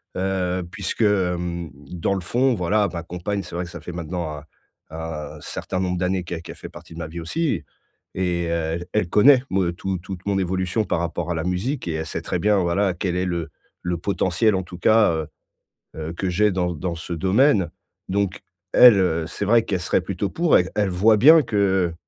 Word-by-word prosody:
Heu, 95 -1 -1
puisque, - - -4
hem, 90 -4 0 0.2
dans 90 +3 -1
le 95 - -3
fond 125 +8 +1
voilà 100 +3 +1
ma 85 -1 -5
compagne 90 +3 -4
c'est - - -11
vrai 90 +1 -2
que - - -10
ça 85 -1 -8
fait 90 - -7
maintenant 85 -1 -4
un 75 - -16 0.4
un 80 -1 -6
certain 95 - -4
nombre 90 -1 -1
d'années 90 0 0
qu'elle 85 -1 -5
qu'elle - - -9
fait - - -9
partie - - -13
de 85 - -8
ma 85 - -4
vie 85 +2 -7
aussi 150 - -1 0.5
et 90 -2 0
et 85 - -3
heu, 85 0 -1
elle 105 -5 +1
connaît 130 +7 +6
me 95 -2 +1
tou 95 0 -3
toute 95 0 -8
mon 100 -1 +1
évolution 95 +3 -1
par - - 0
rapport 85 0 -3
à 85 - -1
la 80 - -2
musique 90 +7 -2
et 80 - -1
elle 80 0 -3
sait 80 0 -4
très 90 - -2
bien, 105 +3 +3
voilà, 90 +1 +1
quel 90 0 -2
est 90 +1 0
le 85 -3 -2 0.3
le 90 -1 -1
potentiel, 100 +3 +1
en 95 - -1
tout 90 0 -11
cas, 110 0 +5
heu 80 -2 -2 0.7
heu, 80 +1 -5
que 95 +2 -3
j'ai 105 +4 +3
dans 90 -2 -1
dans 85 +3 -3
ce 85 +1 -6
domaine, 95 - +3 0.4
donc 100 -1 -1 0.4
elle, 125 -3 +10
heu, 85 -3 +1
c'est 95 - -4
vrai 115 +2 +4
qu'elle 95 -4 -2
serait 90 - +1
plutôt 95 +2 -3
pour. 170 -1 +3
E - - +5
elle 105 -2 +1
voit 105 +5 +4
bien 155 +7 +8
que, 95 -6 +1
90 Hz, 215 wpm, -23 LUFS, 85-100 Hz, 0.7 s, elle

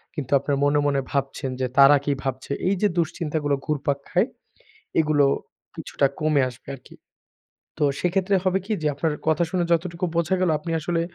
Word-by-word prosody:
কিন্তু 145 -5 -5
আপনার 140 0 -1
মনে, 145 +1 +3
মনে 140 -1 +1
ভাবছেন 135 -1 -2
যে 130 - +1
তারা 140 +1 +8
কি 145 - +1
ভাবছে? 130 0 -4 0.2
এইযে 200 +2 +2
দুশ্চিন্তাগুলো 155 -3 -1
ঘুরপাক 145 -2 -1
খায়, 185 +6 +2 0.7
এগুলো 150 -2 +3 0.5
কিছুটা 140 - 0
কমে 155 -2 +2
আসবে 125 - -18
আরকি। 130 - -15 0.8
তো 150 - +2 0.2
সেক্ষেত্রে 190 +2 +1
হবে 185 +1 +2
কি 220 - -2
যে, - - -1
আপনার 155 +2 -1 0.2
কথা 160 +2 +2
শুনে 180 -1 0
যতটুকু 170 +1 -1
বোঝা 170 +2 +1
গেলো, 180 -3 +2
আপনি 165 +2 -7
আসলে 170 +1 -1
155 Hz, 165 wpm, -24 LUFS, 140-175 Hz, 0.8 s, তারা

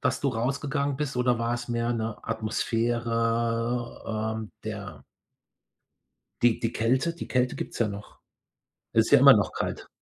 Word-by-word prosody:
dass 130 -1 +1
du 140 - +1
rausgegangen 140 +4 -1
bist 135 -2 -3
oder 125 -1 +2
war 115 +1 0
es 120 +1 -6
mehr 120 0 0
'ne 110 -2 -3
Atmosphäre, 115 0 -1
ähm, 110 -1 -7
der 100 -10 -6 1.4
die 120 -2 +4
die 115 0 -2
Kälte, 130 +9 +1
die 170 - -7
Kälte 125 -1 +1
gibt's - - -6
ja 115 - +3
noch. 100 0 -8 0.7
Ist - - +3
ja - - +8
immer - - +10
noch - - +1
kalt. - - -4
115 Hz, 150 wpm, -27 LUFS, 110-125 Hz, 1.4 s, immer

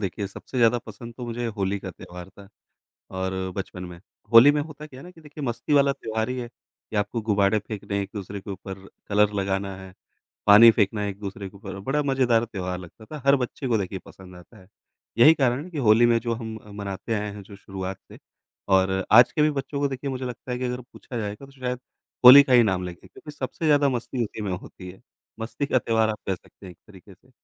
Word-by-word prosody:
देखिए 100 0 -3
सबसे 105 +6 -10
ज़्यादा 120 0 +4
पसंद 115 +2 -11
तो 125 - -6
मुझे 120 0 -3
होली 100 0 -1
का 95 - -6
त्योहार 90 +1 -11
था। 100 0 -16 0.7
और 95 0 -1 0.3
बचपन 90 -1 -5
में, 90 -1 -9 0.3
होली 115 +5 +9
में 150 - 0
होता 150 0 -10
क्या 130 -3 -13
है - - -12
ना 180 - -11
कि 165 - -18
देखिए 150 -1 -10
मस्ती 120 +3 -3
वाला 140 -1 +5
त्योहार 110 -3 -3
ही 130 - -3
है, 125 - -3
ये 120 -2 -13
आपको 105 +3 -1
गुबाडे 105 -1 +2
फेंकने 100 -1 -4
एक-दूसरे 100 0 -7
के 100 - -9
ऊपर, 95 0 -8 0.2
कलर 105 0 +3
लगाना 95 0 -2
है, 95 0 -11 0.5
पानी 105 +3 +9
फेंकना 105 -1 0
एक-दूसरे 100 0 -6
के 100 - -16
ऊपर, 95 -1 -8
बड़ा 140 +8 0
मज़ेदार 130 -4 +2
त्योहार 90 -5 -5
लगता 90 +5 -13
था 150 +2 -9
हर 140 0 +6
बच्चे 130 +1 -4
को 115 -2 +2
देखिए 95 0 -4
पसंद 90 -1 -14
आता 90 - -16
है। 90 - -18 0.5
यही 155 +7 +8
कारण 130 0 0
है 180 - -11
कि 160 - -6
होली 115 +3 +6
में 115 -1 +3
जो 115 0 -2
हम 110 -1 -6
अ, 105 - -17
मनाते 100 +2 -4
आए 105 -1 -2
हैं 100 - -9
जो 100 0 -13
शुरुआत 95 -1 -6
से - - -12 0.5
और 95 0 +2
आज 120 +2 +8
के 150 - +1
भी 155 - +4
बच्चों 140 0 -4
को 140 - +1
देखिए 135 +1 -4
मुझे 130 0 -4
लगता 125 0 -6
है 125 - -3
कि 130 - -3
अगर 125 0 -3
पूछा 120 - -8
जाएगा 105 +5 -5
तो 140 - -18
शायद 125 -2 -4 0.4
होली 135 +3 +12
का 130 - -2
ही 120 -1 +7
नाम 95 -4 0
लेंगे 90 -1 -9
क्योंकि 150 - -12
सबसे 145 +2 -6
ज़्यादा 145 -1 +4
मस्ती 125 -1 -2
उसी 105 +1 -7
में 100 -3 -2
होती 90 0 -8
है, 95 - -16 0.4
मस्ती 120 +5 -3
का 130 - +2
त्योहार 110 -1 +1
आप 105 - -5
कह 95 - 0
सकते 95 +2 -16
हैं - - -9
एक - - -25
तरीके 95 -1 -15
से। 130 +7 -29
110 Hz, 235 wpm, -24 LUFS, 95-130 Hz, 0.7 s, होली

